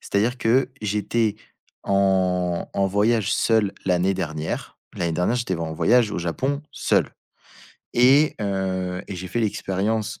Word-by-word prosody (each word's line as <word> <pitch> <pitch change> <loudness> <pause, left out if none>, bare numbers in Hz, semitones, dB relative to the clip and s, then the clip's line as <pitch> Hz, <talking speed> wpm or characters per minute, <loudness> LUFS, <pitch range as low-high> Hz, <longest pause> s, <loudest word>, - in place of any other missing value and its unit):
c'est-à-dire 110 +5 0
que 125 +3 +2
j'étais 105 +1 0 0.5
en-en 95 -1 +1
voyage 105 +1 +1
seul 110 -3 +2
l'année 90 +1 +2
dernière. 80 -4 -4 0.2
L'année 85 -2 -1
dernière 90 +8 +1
j'étais 120 -6 -1
en 80 -1 -4
voyage 105 +8 +3
au - - -3
Japon, 130 - -2
seul. - - +1 0.9
Et 135 +5 +5
heu, 95 -2 -2
et 95 - -5
j'ai 90 0 -6
fait 120 - -2
l'expérience, 105 +1 -1
100 Hz, 130 wpm, -23 LUFS, 90-115 Hz, 0.9 s, Et